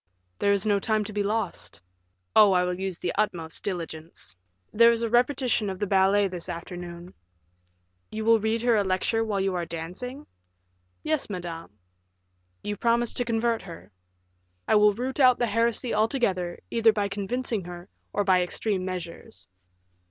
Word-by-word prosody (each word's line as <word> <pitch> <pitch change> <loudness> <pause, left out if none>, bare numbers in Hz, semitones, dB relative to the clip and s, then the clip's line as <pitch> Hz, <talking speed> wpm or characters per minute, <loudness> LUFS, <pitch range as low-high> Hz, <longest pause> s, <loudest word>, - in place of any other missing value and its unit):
"There 200 - +3
is 200 0 +1
no 205 -2 +2
time 215 +1 0
to 210 - -6
be 205 - 0
lost." 200 - -3 0.6
"Oh, 205 -2 +7
I 180 -1 +3
will 180 0 -1
use 190 -2 -3
the 175 - -3
utmost 165 -6 -2
diligence. 165 - -6 0.4
There 230 +2 +7
is 235 0 +1
a 230 - 0
repetition 245 -3 +2
of 190 - -4
the 205 - -1
ballet 195 +1 +3
this 180 -1 -5
afternoon." 175 +1 -7 1.0
"You 215 0 -4
will 230 0 +5
read 220 +2 -1
her 240 -1 +4
a 205 - +3
lecture 190 +4 0
while 210 -3 -1
you 195 0 0
are 175 -1 -1
dancing?" 180 - -6 0.8
"Yes, 310 -6 -1
madame." 170 - -7 0.9
"You 205 0 -3
promise 235 +1 +1
to 245 - 0
convert 230 0 0
her?" 170 - -11 0.8
"I - - +2
will 210 -1 +5
root 255 +5 -4
out 255 -2 +6
the 240 - +1
heresy 230 +2 0
altogether, 210 -6 0
either 230 -1 +4
by 205 -1 -1
convincing 205 +1 -3
her, 175 0 -9 0.2
or 205 - 0
by 185 -2 +4
extreme 185 +2 -1
measures." 170 - -7
205 Hz, 165 wpm, -26 LUFS, 180-230 Hz, 1.0 s, Oh